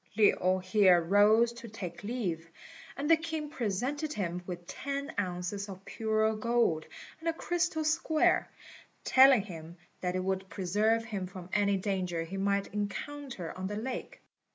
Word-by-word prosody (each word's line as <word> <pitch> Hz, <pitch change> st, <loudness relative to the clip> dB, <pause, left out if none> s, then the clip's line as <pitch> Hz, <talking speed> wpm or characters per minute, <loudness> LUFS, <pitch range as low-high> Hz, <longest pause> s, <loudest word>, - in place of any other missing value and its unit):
Lin 185 Hz, -3 st, +4 dB
here 185 Hz, -1 st, +5 dB
rose 210 Hz, +6 st, +4 dB
to 235 Hz, 0 st, -10 dB
take 180 Hz, -5 st, -7 dB
leave, 185 Hz, -8 st, -3 dB, 0.5 s
and 285 Hz, +2 st, -2 dB
the 330 Hz, -, +7 dB
king 320 Hz, -2 st, -4 dB
presented 275 Hz, +5 st, -2 dB
him 180 Hz, -, -3 dB
with 175 Hz, -1 st, -6 dB
ten 280 Hz, +7 st, -4 dB
ounces 185 Hz, +2 st, -3 dB
of 190 Hz, 0 st, -9 dB
pure 220 Hz, 0 st, 0 dB
gold 215 Hz, -8 st, +1 dB, 0.3 s
and 330 Hz, +1 st, -1 dB
a -, -, 0 dB
crystal 345 Hz, -1 st, -1 dB
square, 310 Hz, 0 st, +2 dB, 0.5 s
telling 260 Hz, -4 st, +6 dB
him 170 Hz, -3 st, -9 dB, 0.2 s
that 180 Hz, 0 st, -2 dB
it 185 Hz, -, -1 dB
would 190 Hz, 0 st, -2 dB
preserve 215 Hz, +5 st, +1 dB
him 200 Hz, -5 st, -4 dB
from 180 Hz, -1 st, -10 dB
any 200 Hz, -1 st, +3 dB
danger 185 Hz, -4 st, -2 dB
he 180 Hz, +4 st, -6 dB
might 200 Hz, +1 st, 0 dB
encounter 210 Hz, -, -4 dB
on 185 Hz, +1 st, -4 dB
the 205 Hz, -, -4 dB
lake. 250 Hz, +4 st, -5 dB
205 Hz, 155 wpm, -31 LUFS, 185-245 Hz, 0.5 s, the